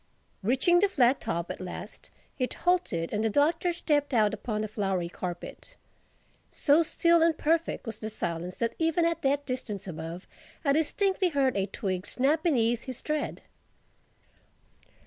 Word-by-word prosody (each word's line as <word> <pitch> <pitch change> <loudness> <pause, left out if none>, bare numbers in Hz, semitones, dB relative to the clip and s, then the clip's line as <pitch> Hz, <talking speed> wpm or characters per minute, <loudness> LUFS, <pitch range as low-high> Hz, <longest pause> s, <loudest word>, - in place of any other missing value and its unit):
Reaching 265 - +3
the 400 +2 +3
flat 260 -6 +3
top 170 +1 -2
at - - -7
last, 180 -1 -8 0.3
it 255 - -1
halted 345 - 0
and 210 +1 0
the 225 - +2
Doctor 315 - +2
stepped 295 -5 0
out 215 -2 +3
upon 215 -3 -3
the 215 - -2
flowery 195 -5 -1
carpet. 180 - -7 0.7
So 295 +3 +3
still 335 +1 +3
and 325 -1 +3
perfect 330 0 0
was 225 -2 -6
the 215 - -4
silence 175 -3 -3
that 230 -1 -1
even 325 +1 +2
at 335 -1 0
that 285 +1 +1
distance 235 -6 -4
above 165 0 -6 0.4
I 280 - +4
distinctly 375 +5 +1
heard 275 -5 +1
a 195 0 0
twig 185 -2 -3
snap 285 +5 +1
beneath 240 -8 +1
his 255 -2 -6
tread. 305 -1 -2
255 Hz, 155 wpm, -28 LUFS, 200-320 Hz, 0.7 s, I